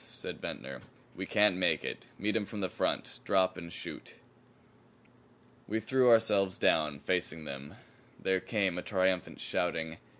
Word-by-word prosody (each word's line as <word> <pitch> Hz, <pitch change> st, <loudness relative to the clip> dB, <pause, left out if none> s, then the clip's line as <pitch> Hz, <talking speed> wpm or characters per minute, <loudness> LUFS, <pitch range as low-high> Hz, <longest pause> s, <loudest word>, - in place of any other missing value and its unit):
said -, -, -6 dB
Ventnor. 65 Hz, -1 st, -6 dB, 0.3 s
"We 95 Hz, 0 st, -5 dB
can't 105 Hz, -3 st, +4 dB
make 95 Hz, -, +1 dB
it. -, -, -5 dB
Meet 105 Hz, +2 st, -1 dB
'em 110 Hz, -2 st, +1 dB
from 105 Hz, -, -5 dB
the 95 Hz, -, 0 dB
front. -, -, -2 dB
Drop 95 Hz, -1 st, +3 dB
and 85 Hz, -2 st, -8 dB
shoot." -, -, -7 dB, 1.5 s
We 110 Hz, +2 st, 0 dB
threw 125 Hz, +3 st, +3 dB
ourselves 105 Hz, -5 st, +4 dB
down, 75 Hz, -2 st, +2 dB
facing 85 Hz, 0 st, -1 dB
them. 70 Hz, 0 st, -7 dB, 0.4 s
There 95 Hz, 0 st, +1 dB
came 95 Hz, -4 st, 0 dB
a -, -, -3 dB
triumphant 95 Hz, -1 st, 0 dB
shouting. 80 Hz, -3 st, -1 dB
95 Hz, 145 wpm, -32 LUFS, 85-105 Hz, 1.5 s, can't